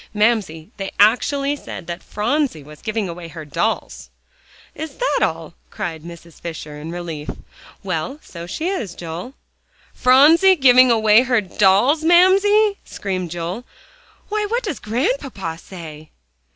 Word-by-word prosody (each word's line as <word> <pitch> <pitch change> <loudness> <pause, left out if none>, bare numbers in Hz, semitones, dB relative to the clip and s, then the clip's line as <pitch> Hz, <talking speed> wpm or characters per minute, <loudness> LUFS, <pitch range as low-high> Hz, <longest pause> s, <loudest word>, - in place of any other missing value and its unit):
Mamsie, 210 -6 0
they 195 -2 -4
actually 275 +7 +3
said 230 - -9
that 170 +1 -6
Phronsie 240 - -1
was 150 +1 -14
giving 215 -2 -2
away 170 0 -7
her 160 -1 -9
dolls." 170 +9 -3 0.6
"Is 315 0 -7
that - - 0
all?" - - -1 0.2
cried 160 -2 -5
Mrs. 170 0 -13
Fisher 160 -3 -7
in 155 +2 -7
relief. 165 -4 -6 0.5
"Well, 185 - -3
so 170 0 -9
she 315 - -3
is, 230 - -3
Joel." 175 - -7 0.6
"PHRONSIE 315 +9 +6
GIVING 255 -4 +6
AWAY 220 -1 +5
HER 250 -3 +2
DOLLS, 205 - +3
MAMSIE?" 395 +5 +4
screamed 185 -3 -4
Joel. 175 +7 -5 0.7
"Why, 425 0 -1
what 480 +3 -1
does 385 - -4
Grandpapa 230 - -2
say?" 155 -5 -10
210 Hz, 135 wpm, -20 LUFS, 170-285 Hz, 0.7 s, PHRONSIE